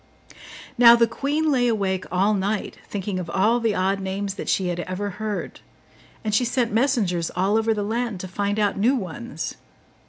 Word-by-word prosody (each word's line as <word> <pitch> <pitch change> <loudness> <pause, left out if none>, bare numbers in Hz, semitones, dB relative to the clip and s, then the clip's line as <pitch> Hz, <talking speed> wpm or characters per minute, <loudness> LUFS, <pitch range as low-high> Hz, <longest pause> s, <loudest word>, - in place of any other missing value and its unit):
Now 235 -1 +9
the 235 0 +4
queen 290 +6 -1
lay 250 -3 +2
awake 195 -5 0
all 195 +4 +2
night, 205 +1 -2
thinking 195 -1 -3
of 175 -2 -5
all 215 +7 +2
the 225 -3 0
odd 195 +2 +1
names 195 +1 -3
that 200 - -6
she 185 -2 +1
had 175 0 -3
ever 185 +3 -3
heard; 215 -2 -4 0.6
and 215 -2 -2
she 235 - +3
sent 240 -2 0
messengers 215 -9 +1
all 190 +4 +1
over 225 0 +2
the 210 -2 0
land 225 -1 -2
to 185 - -6
find 200 +2 -2
out 205 -2 +1
new 245 +7 +3
ones. 235 +3 -5
205 Hz, 185 wpm, -23 LUFS, 190-235 Hz, 0.6 s, Now